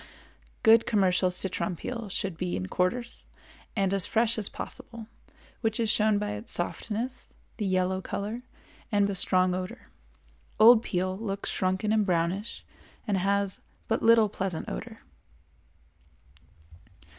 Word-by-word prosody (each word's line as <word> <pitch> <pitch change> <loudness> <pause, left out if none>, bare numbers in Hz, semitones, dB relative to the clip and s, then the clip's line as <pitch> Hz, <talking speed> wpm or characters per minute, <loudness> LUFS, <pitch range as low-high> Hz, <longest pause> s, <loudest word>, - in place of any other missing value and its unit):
Good 225 0 +6
commercial 185 -3 +2
citron 180 +1 +3
peel 230 +3 -6
should 195 -2 -3
be 180 +2 -3
in 90 - -3
quarters 235 +7 -2 0.5
and 195 -2 +1
as 195 -3 0
fresh 230 0 +1
as 205 - -3
possible, 230 -2 -8 0.6
which 220 -2 -1
is 225 -2 +2
shown 215 -1 +3
by 205 0 -2
its 210 +3 -6
softness, 230 +8 -2 0.3
the 210 -4 -2
yellow 185 0 0
color, 210 +5 -4 0.5
and 205 -1 +3
the 200 - -1
strong 185 -1 +4
odor. 185 0 -6 0.7
Old 225 +1 +8
peel 185 -2 -2
looks 200 -1 -4
shrunken 190 +3 0
and 215 -1 +3
brownish 185 +3 -2 0.4
and 200 -3 +1
has 200 +1 0 0.3
but 225 - 0
little 225 -1 +5
pleasant 190 -4 -4
odor. - - -7
200 Hz, 135 wpm, -27 LUFS, 185-220 Hz, 0.7 s, Old